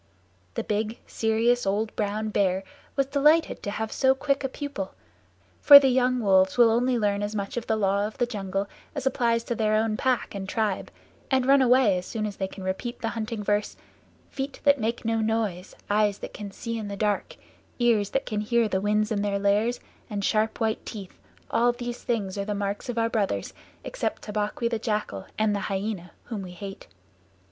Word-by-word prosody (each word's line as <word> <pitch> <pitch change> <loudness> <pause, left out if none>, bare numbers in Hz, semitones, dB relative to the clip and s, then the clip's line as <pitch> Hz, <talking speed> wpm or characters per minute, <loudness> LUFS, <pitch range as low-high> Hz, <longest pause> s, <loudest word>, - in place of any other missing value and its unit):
The - - -1
big, 215 +2 -2
serious, 230 +2 +1
old 210 +3 0
brown 215 +1 -1
bear 190 -2 +1 0.3
was 275 - +2
delighted 300 +4 +3
to - - -4
have 220 +2 -3
so 265 0 +3
quick 275 0 0
a 270 - -1
pupil, 270 -9 -5 0.7
for 285 - +12
the 275 -1 +5
young 250 0 +2
wolves 190 -1 +4
will 235 -2 +7
only 245 +2 +2
learn 205 -2 +1
as 205 +1 -3
much 200 -1 -3
of 240 -1 -4
the 220 - +2
Law 200 -1 +1
of 215 - -10
the 245 - +2
Jungle 195 -4 -3 0.3
as 280 -3 -4
applies 235 -3 +1
to 235 - -2
their 215 -1 +1
own 215 0 +1
pack 255 -2 0
and 195 -1 -5
tribe, 215 -3 -1 0.4
and 260 -2 +2
run 275 +1 +6
away 245 -7 +4
as 180 - -9
soon 220 -2 -3
as 205 -2 -5
they 190 - -1
can 190 0 -10
repeat 190 +6 -3
the 225 - -1
Hunting 225 -1 -4
Verse 205 +1 0 0.5
"Feet 275 +1 -5
that 285 -1 +5
make 230 +1 -2
no 225 0 +1
noise; 215 -5 -1
eyes 205 -1 +2
that - - -8
can 205 -1 -6
see 230 +3 -5
in 215 - -5
the 200 0 -5
dark; 210 -1 -1 0.4
ears 230 -5 +2
that 270 - -1
can 210 -2 -2
hear 235 +1 +2
the 190 -2 -1
winds 210 +2 +1
in 205 -2 0
their 200 -1 0
lairs, 205 +4 +1 0.3
and 200 -2 -2
sharp 220 0 +1
white 220 -1 0
teeth, 200 -4 -9 0.3
all 240 +1 +4
these 240 0 -6
things 205 -5 -2
are 200 - -2
the 210 0 -2
marks 200 +3 -3
of 240 - -3
our 230 0 +2
brothers 200 - -1 0.3
except - - -3
Tabaqui 210 +2 -2
the 230 -1 -1
Jackal 210 - -3
and 215 -1 +2
the 200 - -2
Hyaena 195 -2 -3
whom 220 -4 -5
we 180 -2 -8
hate." 195 +2 -8
215 Hz, 205 wpm, -26 LUFS, 200-240 Hz, 0.7 s, for